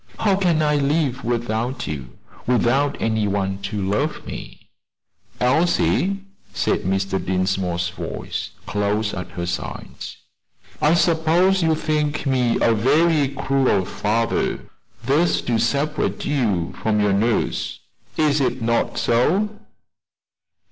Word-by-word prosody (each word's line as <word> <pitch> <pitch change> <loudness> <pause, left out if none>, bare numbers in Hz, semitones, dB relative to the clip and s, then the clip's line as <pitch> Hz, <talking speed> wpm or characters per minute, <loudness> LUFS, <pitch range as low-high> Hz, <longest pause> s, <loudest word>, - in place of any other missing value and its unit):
How 205 -3 +2
can 175 -5 +2
I 150 -1 +2
live 140 -2 0
without 120 +2 -2
you 70 -4 -6 0.3
without 130 +4 +2
any 110 -2 0
one 95 -1 -1
to 100 +1 -4
love 140 +11 -1
me?" - - -9 0.7
"Elsie," 175 +7 +2 0.3
said - - +1
Mr. 95 +1 -1
Dinsmore's 90 -1 0
voice, 90 - -5 0.2
close 105 +1 -1
at 90 - -5
her 85 - -2
side, 85 - -5 0.9
"I 155 +3 +4
suppose 170 +3 +3
you 160 -1 +3
think 150 -1 -1
me 125 -3 +2
a 115 - +4
very 145 +6 +3
cruel 135 -7 +1
father 115 +4 -1 0.4
thus 150 +8 +2
to 115 -2 0
separate 140 +6 0
you 110 - 0
from 105 -1 +1
your 105 -1 +2
nurse. 110 +4 0 0.4
Is 150 -2 +2
it 130 -1 0
not 115 0 0
so?" 165 - +2
125 Hz, 120 wpm, -22 LUFS, 105-150 Hz, 0.9 s, I